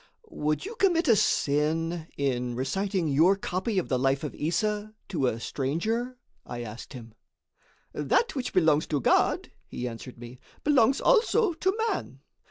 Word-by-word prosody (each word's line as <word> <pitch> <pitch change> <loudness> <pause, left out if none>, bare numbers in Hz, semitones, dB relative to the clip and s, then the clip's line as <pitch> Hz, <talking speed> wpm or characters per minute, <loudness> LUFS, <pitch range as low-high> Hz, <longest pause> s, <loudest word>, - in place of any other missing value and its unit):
"Would 150 - -1
you 430 - -5
commit 350 -4 +3
a 230 - +6
sin 160 -2 +1
in 125 -3 -1
reciting 185 - -1
your 160 +7 +4
copy 195 +2 -2
of 185 - 0
the 130 - 0
life 135 +2 +1
of 150 - -4
Issa 210 +6 -2
to 145 -9 0
a 115 -2 -1
stranger?" 220 - -2 0.3
I 120 0 -6
asked 115 +5 -9
him. 115 -4 -10 0.8
"That 475 - +1
which 255 -2 -3
belongs 160 -4 +3
to 150 - 0
God," 120 - +2 0.2
he 125 - -4
answered 120 +2 -8
me, 120 +1 -11 0.2
"belongs 270 -3 +3
also 460 -4 +3
to 380 +5 0
man. - - -4
165 Hz, 155 wpm, -27 LUFS, 135-225 Hz, 0.8 s, a